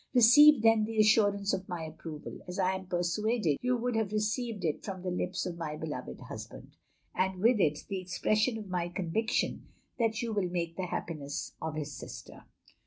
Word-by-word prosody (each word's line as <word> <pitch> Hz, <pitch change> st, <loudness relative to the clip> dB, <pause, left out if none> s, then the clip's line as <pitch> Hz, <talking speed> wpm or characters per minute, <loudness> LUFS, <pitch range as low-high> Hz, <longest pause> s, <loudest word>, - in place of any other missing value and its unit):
Receive 250 Hz, +2 st, +8 dB
then 225 Hz, -1 st, +5 dB
the 225 Hz, 0 st, -5 dB
assurance 205 Hz, -2 st, +4 dB
of 190 Hz, -, -3 dB
my 175 Hz, -2 st, -4 dB
approval, 160 Hz, -1 st, -8 dB
as 180 Hz, -, -6 dB
I 190 Hz, -1 st, +2 dB
am 190 Hz, -1 st, -6 dB
persuaded 175 Hz, -, 0 dB
you 250 Hz, 0 st, +1 dB
would 245 Hz, 0 st, -1 dB
have 220 Hz, -3 st, 0 dB
received 215 Hz, -1 st, -1 dB
it 155 Hz, -, -1 dB
from 185 Hz, -3 st, -6 dB
the 185 Hz, -, -2 dB
lips 180 Hz, +1 st, -2 dB
of 170 Hz, -1 st, -5 dB
my 155 Hz, -2 st, -3 dB
beloved 150 Hz, -, -6 dB
husband; -, -, -9 dB, 0.4 s
and 190 Hz, 0 st, 0 dB
with 225 Hz, +3 st, +4 dB
it 150 Hz, -5 st, +1 dB
the 195 Hz, -2 st, -3 dB
expression 215 Hz, +5 st, +1 dB
of 215 Hz, -2 st, -7 dB
my 175 Hz, -2 st, -2 dB
conviction 190 Hz, +6 st, -1 dB, 0.3 s
that 225 Hz, 0 st, +1 dB
you 230 Hz, -2 st, -2 dB
will 200 Hz, -4 st, 0 dB
make 170 Hz, -2 st, -2 dB
the 185 Hz, 0 st, -3 dB
happiness 150 Hz, -4 st, -4 dB
of 160 Hz, -1 st, -3 dB
his 150 Hz, -1 st, -4 dB
sister. 120 Hz, -1 st, -10 dB
190 Hz, 185 wpm, -31 LUFS, 170-220 Hz, 0.4 s, Receive